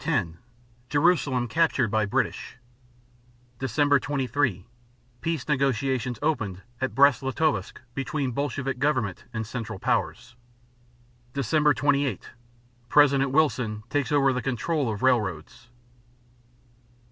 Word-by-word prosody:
10 105 - -1 0.5
Jerusalem 140 -5 +2
captured 135 -5 +1
by 110 -2 +1
British. 100 - -2 1.0
Dec. 140 +2 +2
23 130 -8 -1 0.6
Peace 160 -5 -2
negotiations 130 -3 0
opened 105 - -1 0.2
at 130 - -2
Brest 140 -3 +5
Litovsk 140 +3 -1
between 135 0 -2
Bolshevik 135 0 -3
government 125 -10 -1
and 110 -2 -4
Central 110 -2 -5
Powers. 120 +4 -2 1.0
_Dec. 150 +3 +2
28 140 -5 0 0.6
President 140 -1 +4
Wilson 125 -7 +1
takes 145 0 0
over 135 -2 +3
the 125 - -2
control 135 +2 -1
of 105 +1 -5
railroads. 115 -3 0
135 Hz, 100 wpm, -26 LUFS, 115-145 Hz, 1.0 s, Brest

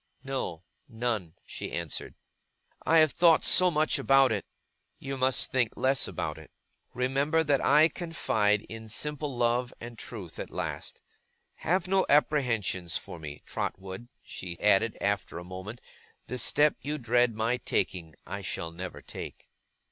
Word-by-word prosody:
'No, 130 - -4 0.3
none,' 110 -8 -2
she - - -7
answered. 85 -3 -4 0.7
'I 165 - +6
have 155 -2 +6
thought 165 +1 +5
so 185 0 +6
much 155 -2 +2
about 135 -2 +5
it.' 105 -3 -2 0.5
'You 135 0 -5
must 130 -1 +2
think 125 -4 +1
less 135 0 +2
about - - -4
it. - - -14 0.5
Remember 140 +6 +2
that 145 -3 +2
I 150 +3 +6
confide 110 - 0
in 110 0 -9
simple 150 +1 -2
love 120 +1 +1
and 120 -1 -9
truth 100 -11 -8
at - - -5
last. - - -5 0.6
Have 180 +1 0
no 190 0 +3
apprehensions 120 - +2
for 85 - -8
me, 75 -2 -8
Trotwood,' 95 +5 -5
she 85 -2 -8
added, 105 +2 +3
after 100 -3 -1
a 85 - -6
moment; 95 +6 -7 0.5
'the 125 +1 -4
step 150 +5 +4
you 150 +2 -2
dread 120 -2 +2
my 115 +3 +1
taking, 90 -9 -2
I 95 +4 -5
shall 85 -3 -4
never 90 +2 -7
take. - - -9
120 Hz, 150 wpm, -29 LUFS, 100-140 Hz, 0.7 s, I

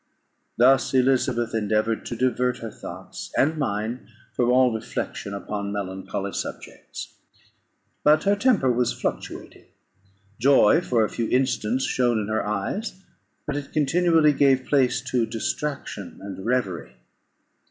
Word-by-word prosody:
Thus 130 +2 +4
Elizabeth 125 -2 +2
endeavoured 110 +1 0
to 120 - -4
divert 125 0 +1
her 115 -1 -7
thoughts - - -9
and 155 +3 +2
mine 110 -1 -3 0.2
from 120 -1 +1
all 125 -1 +4
reflection 110 -2 -4
upon 100 0 -4
melancholy 95 -2 -4
subjects. - - -7 0.9
But 150 +1 +5
her 200 0 +3
temper 200 - +3
was 120 0 0
fluctuating; - - -5 0.7
joy 135 +3 +5
for 120 -9 +2
a - - -4
few 115 - -2
instants 130 -1 +1
shone 120 -2 +1
in 105 -1 -2
her 110 0 0
eyes, 105 - -3 0.5
but 150 - -3
it 145 -1 -6
continually 160 +1 +3
gave 135 -2 +3
place 130 -2 +2
to 120 -3 0
distraction 115 -2 -4
and 95 -1 -8
reverie. 100 - -1
125 Hz, 130 wpm, -24 LUFS, 110-140 Hz, 0.9 s, But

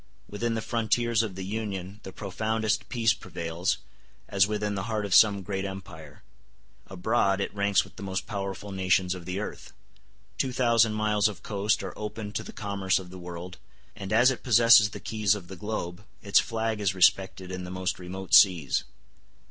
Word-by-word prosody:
Within 115 +3 -2
the 110 - -3
frontiers 115 0 +1
of 105 -5 -4
the 95 0 -5
Union 100 -2 -5
the 95 - -9
profoundest 110 +3 -2
peace 115 -3 +2
prevails, 85 -2 -3 0.5
as 100 0 +3
within 105 -1 -2
the 95 -1 -3
heart 110 -2 -1
of 100 - -2
some 100 -3 +6
great 95 0 -3
empire; 90 -6 -9 0.6
abroad, 95 +1 +1
it 100 - -3
ranks 100 -1 +2
with - - -17
the - - -9
most 95 -1 -3
powerful 100 0 -5
nations 95 -1 +1
of 90 -2 -9
the 90 +1 -4
earth; 105 - -7 0.7
two 130 - 0
thousand 115 -3 +3
miles 105 0 +2
of 105 - -7
coast 105 +1 0
are - - -5
open 105 0 -6
to 110 - -3
the - - -9
commerce 100 -2 -1
of 90 -2 -7
the 95 - -9
world; 90 +1 -8 0.4
and 100 -1 -7
as 120 +4 +5
it 125 - -5
possesses 115 -2 +6
the - - -8
keys 105 -2 +1
of 95 -4 -9
the 95 - -7
globe, 95 -1 -5 0.2
its 100 - +5
flags 110 -2 -2
is 95 -2 0
respected 95 0 +2
in 90 0 -5
the 90 - -7
most 95 0 -3
remote 95 +1 -7
seas. 85 -8 +5
100 Hz, 185 wpm, -27 LUFS, 95-110 Hz, 0.7 s, some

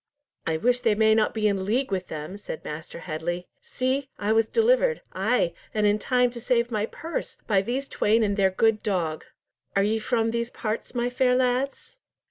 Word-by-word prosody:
"I 160 -1 +1
wish 245 +7 +2
they 230 -4 +2
may 220 0 +4
not 220 -1 +3
be 215 -1 +1
in 195 -2 0
league 235 +5 0
with 185 -1 -2
them," 155 +4 -6
said 205 -5 -7
Master 160 +2 -7
Headley. 175 +2 -3 0.2
"See! 260 +2 -2
I 205 +1 -1
was 225 0 +3
delivered—ay, 450 - +2 0.2
and 215 -1 +2
in 205 +1 +3
time 250 +1 +2
to 235 -1 -8
save 240 0 +1
my 215 -1 0
purse, 325 +7 -5
by 200 -3 +3
these 255 +6 -2
twain 225 -1 +2
and 200 -1 +1
their 195 -2 +3
good 215 +3 +2
dog. 170 -7 -1 0.5
Are 195 - +4
ye 220 +2 +1
from 225 0 0
these 235 0 -1
parts, 220 +2 -4
my 245 0 0
fair 250 0 +3
lads?" 260 - -1
220 Hz, 190 wpm, -26 LUFS, 195-250 Hz, 0.5 s, may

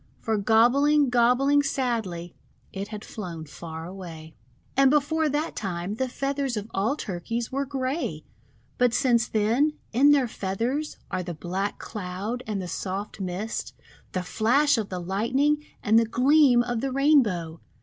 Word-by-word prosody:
For 225 - -1
gob 220 +3 +4
bling, 290 0 +3
gobbling 250 +4 +4
sadly, 225 -11 -2 0.4
it 195 +1 -4
had 210 -1 -8
flown 170 -7 -7
far 160 +1 -8
away. 170 -4 -9 0.4
And 270 0 +5
before 300 +2 +2
that 295 +3 -2
time 185 -1 -3
the 260 +4 -2
feathers 275 -1 -2
of 210 +1 -6
all 210 +8 +1
Tur 185 -10 -4
keys 230 +6 -3
were 275 +1 -1
grey. 260 - -3 0.5
But 245 -1 +3
since 240 -3 +3
then, 230 +8 +2 0.2
in 270 +5 +5
their 280 -4 +4
feathers 230 +9 -3
are - - -1
the 175 -2 -5
black 185 +5 -3
Cloud 205 +4 -5
and 210 -2 -2
the 185 - -4
soft 195 +4 -4
Mist, 190 +4 -4 0.4
the 185 - -1
flash 245 - +3
of 220 -4 -2
the 185 - -4
Lightning, 245 +12 +1 0.2
and 220 +2 +5
the 230 - +2
gleam 255 +1 +4
of 240 -2 -2
the 270 0 -2
Rainbow. 230 - +2
230 Hz, 160 wpm, -26 LUFS, 190-275 Hz, 0.5 s, And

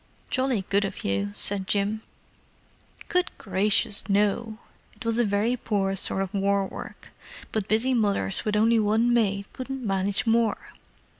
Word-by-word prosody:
"Jolly 255 -7 0
good 200 +1 +2
of 195 - -5
you," 100 +1 -1
said 190 - +1
Jim. 205 +2 0 1.1
"Good 360 0 +1
gracious, 205 +1 +1
no! 210 +2 +1 0.4
It 250 - -11
was 230 +1 0
a - - +4
very 210 +3 +1
poor 200 -5 -1
sort 195 0 +1
of 190 +1 -7
war 200 0 +1
work, - - -9 0.4
but 215 -3 -2
busy 230 +5 +1
mothers 205 -4 +1
with 210 -1 -1
only 225 +2 +4
one 220 +3 +2
maid 200 -4 +1
couldn't 260 -1 -6
manage 195 +1 0
more. 230 -1 +1
210 Hz, 150 wpm, -26 LUFS, 195-230 Hz, 1.1 s, a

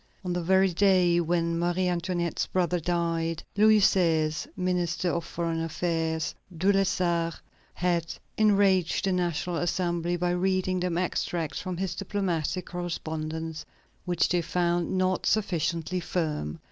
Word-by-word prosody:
On 180 - -1
the 175 - -1
very 190 +2 +4
day 180 -2 +4
when 170 0 0
Marie 175 +2 +1
Antoinette's 175 -1 -1
brother 180 -1 0
died, 165 -1 -1
Louis 215 +1 +6
XVI.'s 160 -5 +2
Minister 180 -1 0
of 170 - -1
Foreign 165 -1 -2
Affairs, 165 -1 -1 0.2
De 190 +4 +3
Lessart, 175 -4 +1 0.4
had 175 -2 0 0.2
enraged 200 -5 +3
the 195 - +1
National 175 -1 -1
Assembly 175 0 0
by 175 0 0
reading 185 0 +1
them 180 -1 -1
extracts 170 -3 -2
from 185 -3 -4
his 190 0 -2
diplomatic 185 -4 -2
correspondence, 160 -2 -4 0.4
which 175 -2 +2
they 175 -1 +2
found 175 +1 0
not 185 0 +1
sufficiently 180 -4 0
firm. 155 - -2
175 Hz, 130 wpm, -27 LUFS, 165-185 Hz, 0.4 s, Louis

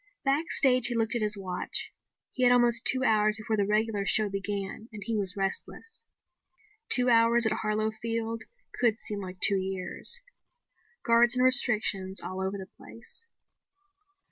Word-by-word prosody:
Backstage 270 -3 +2
he 240 - -4
looked 225 0 -1
at 235 - -3
his 210 -1 +1
watch. 185 -2 -5 0.4
He 255 - -7
had 245 -1 +4
almost 240 -1 +2
two 260 0 +3
hours 215 -3 +1
before 220 0 -4
the 200 -2 -2
regular 210 -1 -2
show 210 +1 +1
began 200 +2 -6
and 210 -2 -10
he 230 -1 -4
was 200 -1 0
restless. 195 - -6 0.8
Two 250 - +3
hours 230 0 +3
at 220 - 0
Harlow 215 0 -3
Field 230 0 -6 0.4
could 230 -3 0
seem 210 -3 -7
like 185 -2 -10
two 200 - +8
years. 190 - -3 0.9
Guards 235 +1 +2
and 250 - 0
restrictions 215 -7 +4
all 185 +1 -8
over 190 +1 -4
the 190 - -9
place. 350 - -11
220 Hz, 155 wpm, -26 LUFS, 200-240 Hz, 0.9 s, two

